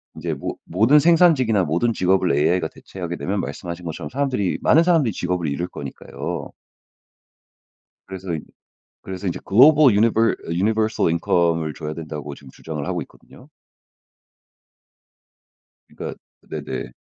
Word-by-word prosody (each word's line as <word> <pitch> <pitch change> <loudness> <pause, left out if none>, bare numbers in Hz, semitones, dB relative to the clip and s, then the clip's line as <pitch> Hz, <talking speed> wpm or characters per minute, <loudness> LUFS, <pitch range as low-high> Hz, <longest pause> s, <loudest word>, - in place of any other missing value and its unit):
인제 80 0 -3
모 70 - -5
모든 115 - +4
생산직이나 150 - +4
모든 90 +9 +1
직업을 95 -1 +2
AI가 85 +3 +2
대체하게 85 +1 -7
되면 100 +2 -2
말씀하신 85 -1 -6
것처럼 80 -1 -5
사람들이 130 -8 -1
많은 160 - +5
사람들이 165 - +2
직업을 90 -2 -2
잃을 85 +5 -2
거니까요. - - -6 1.6
그래서 95 -2 -6
이 - - -3 0.6
그래서 95 +1 -6
인제 85 - -2
Global 145 +8 +6
Univer 115 +1 +3
Universal 110 +3 +1
Income을 85 -2 +1
줘야 75 -2 -5
된다고 75 -3 -7
지금 65 -2 -15
주장을 75 0 -6
하고 90 -2 -2
있거든요. - - -19 2.4
그러니까 - - -7 0.2
네네. - - -6
90 Hz, 385 characters per minute, -22 LUFS, 85-115 Hz, 2.4 s, Global